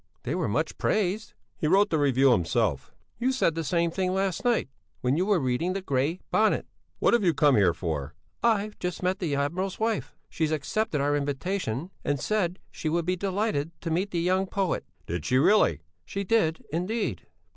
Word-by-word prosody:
They 130 - -2
were 175 -2 0
much 155 +10 -1
praised." 210 +2 0 0.3
"He 155 - 0
wrote 200 +5 +4
the 160 - +2
review 135 -2 +4
himself." 85 -8 +1 0.3
"You 255 +2 +2
said 255 -10 +2
the 165 +1 -3
same 170 +2 +1
thing 185 +1 -1
last 190 -2 -1
night 240 -2 +2 0.3
when 125 +2 +2
you 180 +5 +1
were 205 -4 +3
reading 135 +7 0
the 195 - -3
Grey 140 +4 0
Bonnet." 220 0 +3 0.3
"What - - +3
have 235 -3 +3
you 170 -4 +3
come 145 -3 +5
here 100 -4 +5
for?" 75 -4 -3 0.3
"I've 215 -2 +1
just 180 0 -4
met 185 +1 +1
the 160 -6 -1
admiral's 175 +7 -2
wife; 220 -1 -1
she's 160 -2 -1
accepted 155 +2 -1
our 145 +1 +2
invitation 145 - -2
and 145 -1 0
said 185 - 0
she 155 - -3
would 170 +1 0
be 180 +1 +1
delighted 185 -5 -2
to 165 - -3
meet 185 +5 0
the 175 - -1
young 185 +3 +1
poet." 190 -2 -1 0.2
"Did 85 -1 -3
she 130 - +2
really?" 135 - +4 0.2
"She 200 - -4
did, 180 -6 +1
indeed." 195 +7 -2
170 Hz, 190 wpm, -27 LUFS, 145-195 Hz, 0.3 s, come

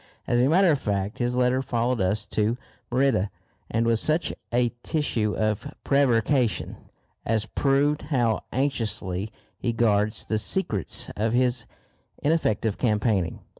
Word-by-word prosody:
As 120 0 +2
a 130 - +3
matter 180 +2 +5
of 145 - +1
fact 100 -1 -2
his 120 0 0
letter 125 +1 +2
followed 120 -2 0
us 100 +3 0
to 110 +3 0 0.3
Merida, 125 -6 +2 0.4
and 115 +1 +1
was 115 -1 +2
such 155 +2 +1 0.2
a 120 0 +2
tissue 120 -10 0
of 110 +6 -1
prevarication 130 -3 +2 0.5
as 110 -1 0
proved 140 +5 +1
how 120 -6 +1
anxiously 110 -7 -1 0.3
he 120 - -1
guards 110 -2 +1
the 110 - 0
secrets 110 - -2
of 110 +2 0
his 125 -1 +1 0.5
ineffective 115 -9 0
campaigning. 105 -6 +1
115 Hz, 130 wpm, -25 LUFS, 105-135 Hz, 0.5 s, matter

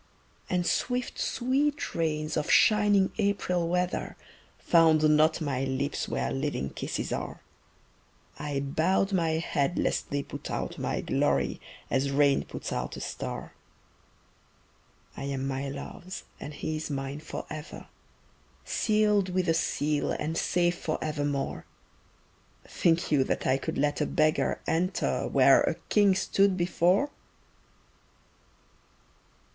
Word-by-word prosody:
And 180 -1 0
swift 250 +6 -1
sweet 280 +4 0
rains 155 -2 -1
of 150 - -1
shining 205 -3 +5
April 180 -4 0
weather 180 +1 -1 0.4
Found 160 -2 +4
not 155 +2 +3
my 135 -4 -1
lips 135 +2 -2
where - - -1
living 135 - -2
kisses - - -3
are; - - -5 1.0
I 145 -2 -2
bowed 175 +8 +1
my 165 -4 +2
head 160 0 0
lest - - 0
they 140 0 -1
put 140 - -8
out - - -4
my - - -1
glory 70 -2 0 0.3
As 135 +1 +1
rain 140 0 +3
puts - - -6
out 60 0 -3
a - - -6
star. - - -5 1.6
I 135 - -5
am 135 -1 -2
my 135 +1 -3
love's 175 +6 -7 0.2
and 150 - -7
he 155 +1 -3
is 155 - -5
mine 135 0 -4
forever, 155 0 -7 0.8
Sealed 210 -3 +2
with 185 0 0
a 165 - +4
seal 150 -2 0
and 160 +2 -3
safe 175 +1 +1
forevermore 145 -3 -2 1.0
Think 170 -1 +1
you 140 -3 +4
that - - -2
I 130 +1 +2
could - - -4
let 145 +1 +1
a - - +1
beggar 155 0 +1
enter 180 +4 0
Where - - +6
a - - +1
king 205 -3 +4
stood 195 0 +2
before? 180 - +2
160 Hz, 125 wpm, -28 LUFS, 140-185 Hz, 1.6 s, Where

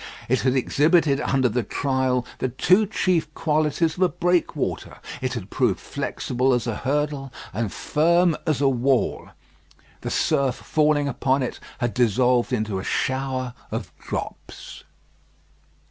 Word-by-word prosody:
It 130 +2 +2
had 130 0 +2
exhibited 145 +2 +3
under 135 -3 +2
the 120 +2 0
trial 130 +1 0
the 130 - 0
two 185 - +3
chief 185 -5 0
qualities 155 +1 +1
of - - -5
a 185 - +5
breakwater; 175 0 -1 0.2
it 130 -1 -1
had 105 -5 -6
proved - - +1
flexible 130 +1 -1
as 120 - -2
a 115 -3 -2
hurdle 140 -1 -1 0.2
and 110 0 -2
firm 170 +2 +2
as 150 -3 +1
a 140 - +4
wall. 130 0 +1 0.7
The - - -4
surf 135 -2 +1
falling 150 -1 +1
upon 135 0 +1
it 125 - -4 0.2
had 120 -2 -1
dissolved 125 +2 +2
into 110 -5 -1
a - - -6
shower 130 0 -1 0.2
of - - -4
drops. - - -7
135 Hz, 140 wpm, -23 LUFS, 125-150 Hz, 0.7 s, a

